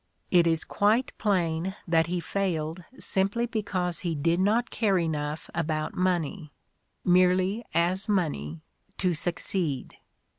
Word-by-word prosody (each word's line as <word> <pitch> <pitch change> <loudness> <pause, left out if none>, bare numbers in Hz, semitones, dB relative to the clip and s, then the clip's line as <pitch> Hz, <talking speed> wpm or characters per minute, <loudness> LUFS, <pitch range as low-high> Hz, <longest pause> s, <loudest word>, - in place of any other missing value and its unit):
It 175 -2 +5
is 165 -1 +2
quite 220 +5 +1
plain 185 -2 0
that 165 -1 +3
he 175 +1 -1
failed 170 -3 -2
simply 195 +5 0
be 225 -2 -2
cause 180 -4 -2
he 170 -2 -2
did 165 +4 +1
not 220 +6 +2
care 205 -5 +2
enough 155 -2 -2
about 155 -2 -1
money, 175 -3 -1 0.5
merely 185 +4 +3
as 180 +4 +1
money, 85 - -1 0.3
to 180 -2 +1
succeed. 165 -3 -2
180 Hz, 125 wpm, -27 LUFS, 160-195 Hz, 0.5 s, It